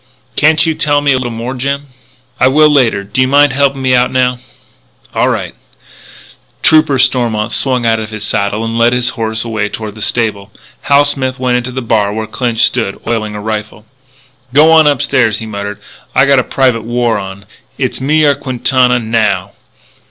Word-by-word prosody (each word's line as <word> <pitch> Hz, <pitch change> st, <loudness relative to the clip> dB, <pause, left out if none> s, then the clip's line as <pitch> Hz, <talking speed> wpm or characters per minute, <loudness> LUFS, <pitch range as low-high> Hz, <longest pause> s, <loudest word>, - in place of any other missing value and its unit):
"Can't 155 Hz, 0 st, +3 dB
you 160 Hz, -, +1 dB
tell 145 Hz, -1 st, +1 dB
me 145 Hz, -1 st, +2 dB
a -, -, +1 dB
little 125 Hz, -1 st, -3 dB
more, 115 Hz, +2 st, -5 dB
Jim?" 140 Hz, +2 st, -3 dB, 0.5 s
"I -, -, +4 dB
will, 150 Hz, +3 st, +4 dB
later. 125 Hz, -8 st, +2 dB
Do 105 Hz, +6 st, -2 dB
you 130 Hz, -, +3 dB
mind 145 Hz, 0 st, +4 dB
helping 135 Hz, -1 st, 0 dB
me 130 Hz, 0 st, +2 dB
out 125 Hz, 0 st, +2 dB
now?" 125 Hz, -1 st, 0 dB, 0.7 s
"All -, -, +1 dB
right." -, -, -3 dB, 1.1 s
Trooper 155 Hz, -3 st, +4 dB
Stormont 120 Hz, -4 st, 0 dB
swung 125 Hz, -3 st, 0 dB
out 115 Hz, -1 st, +2 dB
of 110 Hz, 0 st, -6 dB
his 110 Hz, -1 st, -7 dB
saddle 100 Hz, +2 st, -1 dB
and 115 Hz, +1 st, -3 dB
led 120 Hz, +1 st, +3 dB
his 125 Hz, -1 st, +1 dB
horse 110 Hz, -2 st, -3 dB
away 110 Hz, -3 st, -2 dB
toward 110 Hz, -1 st, -7 dB
the 110 Hz, -, -11 dB
stable. 105 Hz, -3 st, -2 dB, 0.4 s
Hal 140 Hz, 0 st, +5 dB
Smith 130 Hz, -2 st, -1 dB
went 125 Hz, -1 st, 0 dB
into 125 Hz, +1 st, -4 dB
the 130 Hz, 0 st, -5 dB
bar 105 Hz, -3 st, +1 dB
where 110 Hz, 0 st, -3 dB
Clinch 120 Hz, 0 st, -1 dB
stood, 115 Hz, -6 st, -1 dB
oiling 110 Hz, -2 st, -2 dB
a -, -, -5 dB
rifle. 105 Hz, 0 st, -5 dB, 0.7 s
"G'wan 160 Hz, +1 st, +6 dB
upstairs," 125 Hz, -6 st, +1 dB
he 110 Hz, -, -7 dB
muttered. 100 Hz, -1 st, -6 dB, 0.4 s
"I 135 Hz, -, +5 dB
got 140 Hz, -1 st, +4 dB
a -, -, +1 dB
private 130 Hz, -4 st, 0 dB
war 120 Hz, -1 st, -1 dB
on. 95 Hz, 0 st, -9 dB, 0.3 s
It's -, -, -2 dB
me 155 Hz, +3 st, +2 dB
or 145 Hz, -, +4 dB
Quintana, 125 Hz, -1 st, +1 dB
now." 110 Hz, -2 st, -1 dB
125 Hz, 185 wpm, -13 LUFS, 110-135 Hz, 1.1 s, G'wan